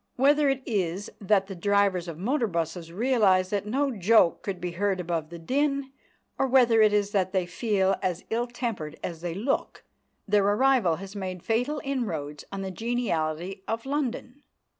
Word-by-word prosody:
Whether 285 +2 +4
it 270 -1 -1
is 195 -3 -2
that 195 -1 +3
the 195 - -7
drivers 195 -1 +1
of 165 -2 -6
motor 235 - 0
buses 165 -1 -3
realise 195 -4 +2
that 205 0 -1
no 275 +5 +1
joke 210 -4 +3
could 195 -3 -4
be 175 0 -3
heard 190 +2 0
above 165 -3 -2
the 170 - -8
din, 275 - -1 0.5
or 270 - +2
whether 240 -3 +5
it 215 -1 +6
is 205 -1 +1
that 190 -2 0
they 185 -2 +1
feel 195 0 +1
as 180 -1 -2
ill 235 +2 0
tempered 225 - -4
as 165 -2 -5
they 170 -1 -4
look, 235 +8 -2 0.4
their 205 0 +3
arrival 210 -3 +3
has 195 +4 -9
made 185 -3 -5
fatal 250 +7 0
inroads 165 - -3
on 195 0 -4
the 190 - -4
geniality 190 -6 -2
of 225 +2 -3
London. 270 -1 -3
200 Hz, 175 wpm, -27 LUFS, 180-245 Hz, 0.5 s, it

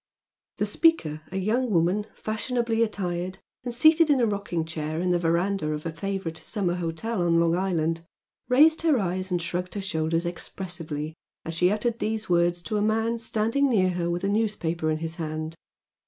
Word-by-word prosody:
The - - +1
speaker, 160 - +2
a 190 - -3
young 230 +6 +1
woman 185 +3 +2
fashionably 230 +1 -1
attired 185 -4 -2 0.3
and 245 - -3
seated 315 +6 +5
in 285 -3 +4
a 240 - +4
rocking 200 -6 -2
chair 155 -1 -3
in 180 +1 +1
the 175 - +2
verandah 170 0 +1
of 150 +1 -5
a 165 - -3
favourite 190 -1 -3
summer 190 -3 -2
hotel 175 +5 -2
on 170 -1 +3
Long 170 0 +3
Island, 165 -3 0 0.5
raised 305 +5 +6
her 320 -4 +3
eyes 185 -2 -1
and 180 -1 0
shrugged 180 +2 -3
her - - -2
shoulders 165 -3 0
expressively 165 -3 -4 0.3
as 165 - -4
she 180 +2 +3
uttered 225 +3 -1
these 220 0 -2
words 175 0 +2
to 215 +2 -2
a - - +1
man 225 +2 +1
standing 230 +5 +1
near 185 -6 +3
her 175 -1 -1
with 175 +1 -2
a - - +1
newspaper 185 -7 0
in 155 - +1
his 160 +1 -3
hand. 155 0 -4
180 Hz, 185 wpm, -26 LUFS, 165-220 Hz, 0.5 s, raised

